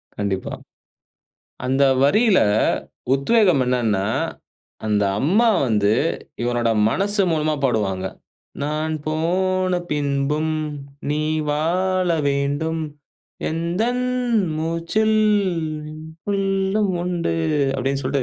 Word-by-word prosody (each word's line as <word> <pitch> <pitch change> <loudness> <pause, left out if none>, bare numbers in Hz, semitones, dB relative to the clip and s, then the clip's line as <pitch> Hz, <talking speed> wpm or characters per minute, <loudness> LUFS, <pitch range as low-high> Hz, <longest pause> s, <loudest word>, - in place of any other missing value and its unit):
கண்டிப்பா. 100 -2 -2 1.1
அந்த 135 +2 +2 0.2
வரியில 210 +7 +4 0.7
உத்வேகம் 180 - +3
என்னன்னா, 115 -6 +1 0.8
அந்த 105 -1 +2 0.2
அம்மா 205 - +3 0.2
வந்து 105 -2 +2 0.5
இவனோட 120 -1 +1 0.2
மனசு 200 - +1
மூலமா 155 -1 +1
பாடுவாங்க. 100 -7 0 0.6
"நான் 155 +2 -1
போன 185 +4 0 0.2
பின்பும் 145 +2 0 0.6
நீ 150 +1 0 0.3
வாழ 180 +5 +1 0.2
வேண்டும். 145 +4 -1 0.7
எந்தன் 190 +10 -1 0.5
மூச்சில் 170 +7 0 0.7
உனக்குள்லும் 195 +5 -1
உண்டு" 175 -2 -1 0.4
அப்படின் 135 +1 -1
சொல்ட்டு 135 +1 0
155 Hz, 80 wpm, -21 LUFS, 135-185 Hz, 1.1 s, வரியில